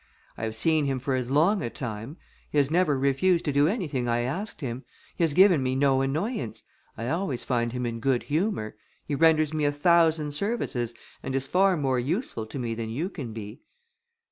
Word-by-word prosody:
I 110 - -4
have 110 0 -4
seen 155 +5 +2
him 135 -1 0
for 135 +1 -2
as 130 -1 -1
long 165 +9 +3
a 120 - -2
time; 115 - -6 0.3
he - - -3
has 140 0 +3
never 165 -4 +2
refused 140 +7 +2
to 150 - +1
do 140 +1 +4
anything 155 - -1
I 120 0 +1
asked 155 - -4
him: 130 -1 -4 0.3
he - - 0
has 160 -3 +3
given 185 -6 +6
me 130 0 0
no 135 -1 +3
annoyance; 150 - -2 0.3
I 115 - -4
always 160 -5 -1
find 120 -2 0
him 125 0 -3
in 115 -1 -3
good 125 +1 +1
humour; 155 - -1 0.3
he 150 - -4
renders 155 0 +3
me 155 -1 -1
a 145 - +3
thousand 160 0 +3
services, 145 - -2 0.3
and 130 - -4
is 135 0 0
far 185 +4 +3
more 135 -4 +1
useful 130 - -2
to 110 - -7
me 120 -3 -2
than 115 0 -4
you 150 +11 -2
can 130 -11 -6
be." 110 0 -8
140 Hz, 205 wpm, -26 LUFS, 120-165 Hz, 0.3 s, given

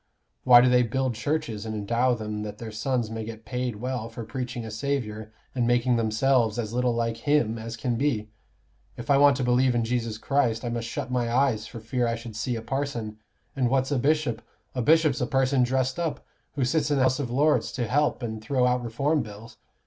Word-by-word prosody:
Why 120 -1 +9
do 125 - +4
they 125 0 +5
build 130 +2 0
churches 115 -3 -2
and 110 -1 -4
endow 120 +4 +1
them 105 -1 -4
that 105 -1 -6
their 115 -1 -7
sons 115 +1 -1
may 110 0 -4
get 110 0 -8
paid 125 -2 -3
well 120 0 -4
for 115 0 -7
preaching 120 0 -5
a 110 - -6
Saviour, 110 -3 -3 0.2
and 120 -2 0
making 120 +1 +3
themselves 115 0 +2
as 115 -2 -3
little 125 -1 +1
like 115 -1 -1
Him 115 -4 +1
as 115 +1 -6
can 120 -1 -1
be? 115 -6 0 0.7
If 120 +3 -3
I 140 - +5
want 140 -2 +6
to 135 - -1
believe 125 +1 +3
in 115 -1 +1
Jesus 115 -2 -2
Christ, 125 -2 0
I - - -1
must 115 -1 -3
shut 130 0 -4
my 120 -2 0
eyes 120 -4 +1
for 115 - -9
fear 120 +2 -1
I 115 - 0
should 115 -1 -9
see 120 +3 -2
a 115 - -5
parson. 115 -4 -3 0.4
And 130 -3 +1
what's 130 +1 +1
a 140 - +1
bishop? 140 -4 +1 0.3
A 125 - -1
bishop's 155 0 +3
a 125 - 0
person 135 -1 +2
dressed 130 +3 0
up, 165 -3 -3 0.3
who 135 -3 +1
sits 150 +4 +1
in 145 - +2
the 130 - +3
House 130 +1 +2
of 135 -4 -2
Lords 145 +5 +2
to 120 - -1
help 140 +1 +1
and 110 -2 -4
throw 130 +1 +1
out 125 0 +1
Reform 140 +7 0
Bills. 110 +1 -10
120 Hz, 220 wpm, -26 LUFS, 115-130 Hz, 0.7 s, Why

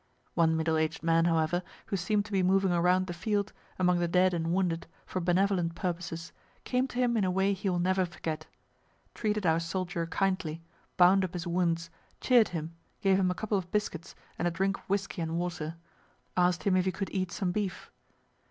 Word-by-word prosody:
One 160 -1 +3
middle 160 0 +1
aged 160 +1 -1
man, 165 0 +3
however, 165 +1 +2 0.2
who 205 - -2
seem'd 205 +3 0
to 220 - -11
be 195 -2 +2
moving 190 +1 +3
around 180 +2 +3
the 175 - -5
field, 200 +3 -1 0.2
among 180 -1 +3
the 175 - +1
dead 180 +2 +3
and 165 -1 -1
wounded, 175 -2 0 0.2
for 185 - -3
benevolent 180 -1 +1
purposes, 170 -2 -4 0.3
came 255 +1 0
to 245 - -9
him 245 -1 +2
in 210 - +2
a 185 - +2
way 190 +2 +2
he 195 +1 -2
will 180 - 0
never 185 +2 +2
forget; 155 -2 -5 0.7
treated 210 -2 -1
our 160 -1 +4
soldier 175 0 -2
kindly, 170 -3 -1 0.3
bound 185 +2 +6
up 185 0 -3
his 175 -2 -4
wounds, 170 -1 0 0.3
cheer'd 245 -4 +5
him, 165 -1 -5 0.3
gave 195 -1 +4
him 185 -1 +2
a 180 - -1
couple 210 -1 0
of 180 -1 -8
biscuits 180 -5 -3 0.2
and 175 - +1
a - - +3
drink 195 +3 -1
of - - -21
whiskey 195 -2 -1
and 165 0 -2
water; 170 -2 -3 0.6
asked 180 -1 +2
him 195 -2 +3
if 185 -1 +2
he 190 - +1
could 195 +1 -4
eat 185 -2 -2
some 185 -4 -1
beef. 200 0 -3
180 Hz, 200 wpm, -30 LUFS, 170-195 Hz, 0.7 s, bound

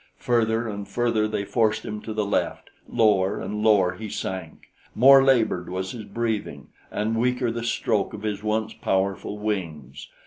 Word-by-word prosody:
Further 115 -1 +1
and 100 -2 -5
further 115 0 +1
they 105 -2 -3
forced 110 0 +1
him 105 0 -5
to 110 - -7
the 105 -1 -1
left; 100 - -2 0.2
lower 105 -4 +2
and 105 0 -4
lower 100 -4 +4
he 105 +3 -7
sank. 95 -5 -6 0.2
More 135 +3 +8
labored 115 -10 +2
was 95 +1 -3
his 110 -4 -7
breathing, 110 - -3 0.2
and 110 +2 -1
weaker 125 0 +1
the 115 0 -4
stroke 110 -3 0
of 105 - -10
his 105 -2 -2
once 110 +1 -1
powerful 95 +2 -1
wings. 80 - -4
105 Hz, 165 wpm, -24 LUFS, 100-115 Hz, 0.2 s, More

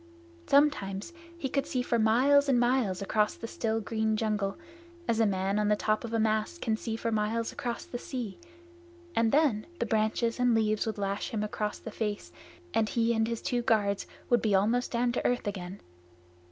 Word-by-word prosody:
Sometimes 280 - +2 0.2
he 285 - -2
could 275 +1 -1
see 250 -2 -1
for 235 -1 +1
miles 270 +6 +4
and 250 -3 +4
miles 240 -6 +1
across 210 +2 +1
the - - -7
still 225 -1 -1
green 220 0 -1
jungle, 210 -3 -1 0.5
as 230 -1 +1
a 225 - +4
man 195 +1 0
on 210 - +1
the 210 - +4
top 215 +1 0
of 230 - -5
a 230 - +1
mast 220 +8 0
can 225 -7 0
see 220 0 -4
for 230 +1 -2
miles 220 +1 0
across 240 -1 -4
the 245 - -6
sea, 240 -8 -5 0.8
and 230 -1 +3
then 280 -8 +2
the 235 - -1
branches 220 +2 0
and 245 -2 +4
leaves 215 0 +1
would 220 - -2
lash 200 0 -2
him 215 -2 -2
across 210 0 -3
the 225 - -8
face, 210 -1 -3 0.4
and 220 -1 +2
he 235 0 +2
and 225 -1 +1
his 230 -1 -4
two 245 -1 0
guards 205 -4 +1 0.2
would 240 -2 +3
be 210 -3 +2
almost 225 +6 +2
down 240 0 +1
to 240 - -2
earth 245 -1 0
again. 195 -2 -5
225 Hz, 195 wpm, -29 LUFS, 210-240 Hz, 0.8 s, miles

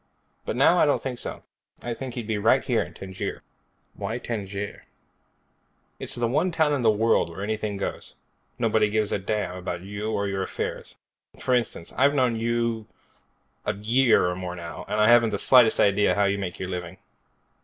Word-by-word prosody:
But - - -1
now 145 +7 +5
I - - +5
don't 145 - +2
think 125 -3 -5
so. - - -6 0.4
I 120 - -2
think 125 +1 -7
he'd 120 -3 -4
be 110 -1 -1
right - - +3
here - - +1
in - - -7
Tangier." 95 -1 -6 0.5
"Why 115 - -4
Tangier?" 100 -4 -5 1.1
"It's - - -4
the 120 -1 0
one 155 +9 +1
town 160 -3 +2
in 140 - 0
the 115 - +4
world 110 -3 +2
where 85 +4 -7
anything 105 -1 -2
goes. 100 - -5 0.4
Nobody 110 -3 +2
gives 105 -1 0
a - - 0
damn 100 -2 -2
about 90 -1 -4
you 100 +3 -5
or 100 -1 -1
your 95 -1 -2
affairs. - - -5 0.4
For 130 - -1
instance, 115 -8 -1
I've 140 +2 +3
known 125 -4 +2
you 115 -1 -1 0.8
a - - -1
year 115 +2 +3
or 90 0 0
more 90 -1 -5
now, 85 -1 -8
and 105 - -1
I 105 - +5
haven't 120 -1 +6
the 105 - -2
slightest 120 0 +5
idea 100 +1 +4
of - - -4
how 100 - +3
you 100 0 0
make 90 -3 -4
your 95 - -5
living." 90 -1 -5
110 Hz, 195 wpm, -25 LUFS, 100-120 Hz, 1.1 s, haven't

